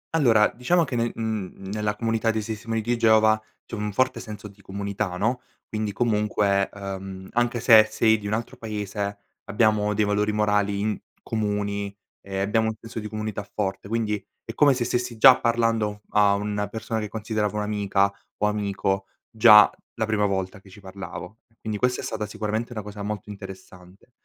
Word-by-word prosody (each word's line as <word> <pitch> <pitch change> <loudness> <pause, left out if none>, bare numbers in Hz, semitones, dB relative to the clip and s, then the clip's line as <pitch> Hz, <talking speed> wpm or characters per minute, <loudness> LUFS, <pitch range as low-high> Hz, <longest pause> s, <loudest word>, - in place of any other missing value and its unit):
Allora 115 -8 +5
diciamo 165 +8 +2
che 130 -4 -4
nel 115 0 0
mhmm, 105 -4 -4
nella 105 -1 -1
comunità 115 +1 0
dei 110 -1 0
testimoni 110 +1 -3
di 120 +2 0
Geova 110 -1 +4 0.2
c'è - - -16
un 105 -1 -3
forte 130 +6 +1
senso 105 -1 -8
di 100 0 -18
comunità 100 -1 -4
no, 120 +5 0 0.3
quindi 110 -1 -2
comunque, 105 -3 +1
ehm, 95 -1 -7
anche 120 0 +1
se 110 -2 +7
sei 110 0 +3
di 105 - -6
un 105 - -2
altro 115 +4 -3
paese 105 -2 -4 0.3
abbiamo 105 -1 +2
dei 105 0 +2
valori 105 +1 +1
morali 105 -1 +1
in 105 0 0 0.3
comuni, 100 -2 -2 0.3
ehm, 95 -1 -4
abbiamo 110 +3 +1
un 110 - -2
senso 115 0 -7
di 105 - -5
comunità 110 -1 -4
forte. 100 -1 -2
Quindi 105 -3 -1 0.2
è 115 - -6
come 140 +1 +5
se 120 -1 -1
stessi 120 -1 -2
già 130 +3 +8
parlando 115 -3 +1
a 105 -1 +4
una 105 0 -2
persona 110 +1 -4
che 105 - -3
considero 110 0 -2
come 105 0 -3
un'amica 100 -1 +1 0.3
o 105 - 0
amico 100 -2 -1 0.3
già 110 -2 +8 0.3
la 110 -2 0
prima 105 -1 +1
volta 95 +1 -2
che 95 - -18
ci 95 - -14
parlavo. 100 +2 -8 0.2
Quindi 110 -2 -4
questa 125 +2 +1
è - - -10
stata 105 - -3
sicuramente 110 +3 -3
una 105 -4 -5
cosa 105 0 -8
molto 105 0 -5
interessante. 95 +1 -12
105 Hz, 180 wpm, -25 LUFS, 100-110 Hz, 0.3 s, già